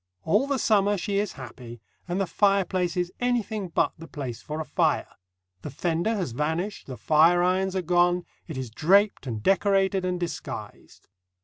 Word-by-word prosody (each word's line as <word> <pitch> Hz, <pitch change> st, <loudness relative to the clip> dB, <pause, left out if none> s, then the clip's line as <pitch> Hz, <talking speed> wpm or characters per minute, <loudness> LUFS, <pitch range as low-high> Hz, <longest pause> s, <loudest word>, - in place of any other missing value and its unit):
All 210 Hz, +11 st, +2 dB
the 280 Hz, -1 st, 0 dB
summer 205 Hz, -3 st, +2 dB
she 200 Hz, +2 st, -1 dB
is 205 Hz, 0 st, -2 dB
happy, 125 Hz, -2 st, -10 dB, 0.3 s
and 180 Hz, +2 st, -2 dB
the 195 Hz, -, +1 dB
fireplace 185 Hz, -2 st, +1 dB
is 180 Hz, 0 st, -1 dB
anything 230 Hz, -5 st, -1 dB
but 170 Hz, -, +1 dB
the 165 Hz, -, -9 dB
place 130 Hz, -8 st, -6 dB
for 155 Hz, +1 st, -5 dB
a 160 Hz, -, -3 dB
fire; -, -, +1 dB, 0.6 s
the -, -, -6 dB
fender 170 Hz, -, -1 dB
has 180 Hz, -, -2 dB
vanished, 160 Hz, -, -2 dB
the 130 Hz, -2 st, -7 dB
fireirons 175 Hz, +4 st, +3 dB
are 185 Hz, -, -1 dB
gone, 175 Hz, +1 st, +2 dB, 0.2 s
it 160 Hz, -6 st, -6 dB
is 130 Hz, -3 st, -5 dB
draped 195 Hz, -, +3 dB
and 110 Hz, -3 st, -4 dB
decorated 195 Hz, 0 st, +2 dB
and 180 Hz, -1 st, -1 dB
disguised. 175 Hz, -1 st, -7 dB
180 Hz, 170 wpm, -26 LUFS, 160-200 Hz, 0.6 s, fireirons